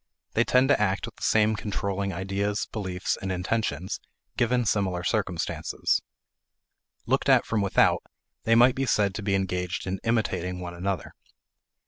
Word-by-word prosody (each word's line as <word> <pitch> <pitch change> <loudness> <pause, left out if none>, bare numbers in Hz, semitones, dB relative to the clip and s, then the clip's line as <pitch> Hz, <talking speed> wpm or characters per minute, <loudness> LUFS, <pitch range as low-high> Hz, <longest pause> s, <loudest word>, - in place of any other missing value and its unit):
They 120 - +3
tend 125 +2 +4
to 140 - +4
act 100 -1 +1
with - - -11
the - - -18
same 110 0 +3
controlling 100 -2 -2
ideas, 100 +3 -1
beliefs, 95 -4 -2
and 95 - -2
intentions, 90 -2 -2 0.4
given 120 0 +2
similar 95 -4 0
circumstances. 95 -4 -1 1.0
Looked - - +1
at - - +5
from 110 -2 0
without, 100 -1 +3 0.4
they 115 - +4
might 120 +2 +6
be 135 +1 -2
said 100 -4 +2
to 100 - -5
be 100 -1 +1
engaged 90 -2 -2
in 95 0 -3
"imitating" 95 -6 0
one 90 -1 -6
another. 95 0 -3
100 Hz, 150 wpm, -26 LUFS, 95-110 Hz, 1.0 s, might